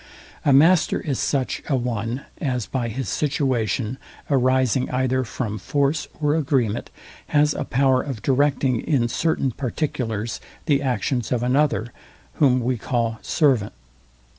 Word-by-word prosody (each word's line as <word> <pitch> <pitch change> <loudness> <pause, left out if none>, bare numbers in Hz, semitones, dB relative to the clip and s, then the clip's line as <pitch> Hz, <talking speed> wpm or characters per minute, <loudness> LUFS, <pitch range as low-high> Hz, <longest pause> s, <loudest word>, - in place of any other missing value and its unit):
A 145 - +3
master 160 +5 +5
is 140 -4 -3
such 135 -3 -1
a 140 - +3
one 120 0 -2 0.2
as 125 -6 -1
by 125 -3 -2
his 120 +1 -4
situation, 130 - -1 0.3
arising 130 -1 +2
either 130 0 +1
from 110 -3 -4
force 140 - 0
or 150 -1 +2
agreement, 130 -8 0 0.4
has 150 0 +3
a - - -3
power 130 -1 +2
of 130 -7 -6
directing 135 -2 +2
in 130 -6 +1
certain 135 +1 0
particulars 120 -4 -3 0.2
the 140 -4 +2
actions 125 -1 -1
of 120 -2 0
another, 125 -3 +1 0.5
whom 130 -4 +4
we 120 0 -1
call 115 -2 -1
servant. 130 -10 +1
130 Hz, 135 wpm, -23 LUFS, 120-140 Hz, 0.5 s, master